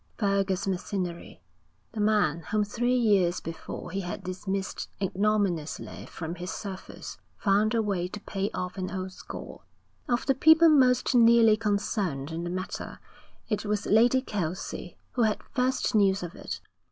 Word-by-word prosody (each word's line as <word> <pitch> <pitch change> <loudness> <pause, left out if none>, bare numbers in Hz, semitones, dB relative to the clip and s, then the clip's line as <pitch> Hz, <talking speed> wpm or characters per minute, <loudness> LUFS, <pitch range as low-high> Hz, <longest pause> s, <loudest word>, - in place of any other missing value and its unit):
Fergus 195 -2 +1
Macinnery, 180 -2 -3 0.5
the 225 - -6
man 210 -7 +2
whom 215 -1 +2
three 240 +4 0
years 195 -7 +3
before 165 +1 -7
he 195 +2 -2
had 180 +1 -5
dismissed 190 +1 -4
ignominiously 195 -5 -1
from 165 0 -6
his 180 +1 -6
service, 190 -1 -7 0.2
found 210 +3 +2
a 225 - +2
way 190 -4 -1
to 210 - -7
pay 200 0 -2
off 180 +1 -5
an 185 - -2
old 190 -1 -4
score. - - -9 0.5
Of 240 0 +1
the 270 - +4
people 320 +5 +7
most 255 -5 +4
nearly 230 -2 +6
concerned 200 -9 -1
in 165 +1 -4
the 175 - -3
matter, 185 +2 -5 0.5
it 210 - -1
was 210 -1 -1
Lady 240 +4 +4
Kelsey 180 - -4
who 250 - -1
had 215 -2 +1
first 255 -1 +1
news 195 -3 +3
of 175 0 -6
it. - - -6
200 Hz, 155 wpm, -28 LUFS, 185-220 Hz, 0.5 s, people